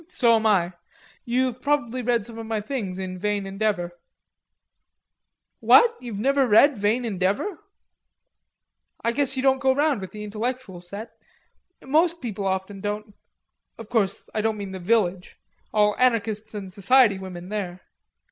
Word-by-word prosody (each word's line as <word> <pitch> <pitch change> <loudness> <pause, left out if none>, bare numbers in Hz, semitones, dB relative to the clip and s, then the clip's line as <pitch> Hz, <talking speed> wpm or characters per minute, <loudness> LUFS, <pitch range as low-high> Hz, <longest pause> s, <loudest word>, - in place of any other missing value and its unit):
"Um - - -19
hum, 360 - -29
so 235 -2 +5
am 225 0 0
I. 185 -4 +2 0.5
You're 250 +1 +1
probably 255 -1 -1
read 235 -3 +1
some 230 0 -9
of 225 - -7
my 220 -1 -1
things 210 -5 -4
in 185 -1 -5
Vain 205 0 -1
Endeavor.... 195 -3 -2 1.6
What, 470 -1 +6
you've 235 -5 -6
never 270 +4 +2
read 260 +6 +6
Vain 215 +4 0
Endeavor? 205 - -1 1.4
I 230 - +2
guess 270 +1 +1
you 260 - -1
didn't 265 -1 +3
go 265 -1 +2
round 290 -6 +1
with 190 - -7
the 210 0 -8
intellectual 215 -2 -4
set.... 200 +6 -8 0.7
Musical 330 +5 +2
people 210 - -4
often 190 +1 -3
don't.... 210 +1 -4 0.6
Of 225 -2 -10
course 200 -5 0
I 215 - 0
don't 220 0 0
mean 200 -2 -6
the 190 - -6
Village. 185 -2 0 0.3
All 210 -1 +3
anarchists 220 -3 +1
and 195 -3 -7
society 210 0 +4
women 180 -1 -8
there...." 185 -4 -4
215 Hz, 155 wpm, -24 LUFS, 195-250 Hz, 1.6 s, What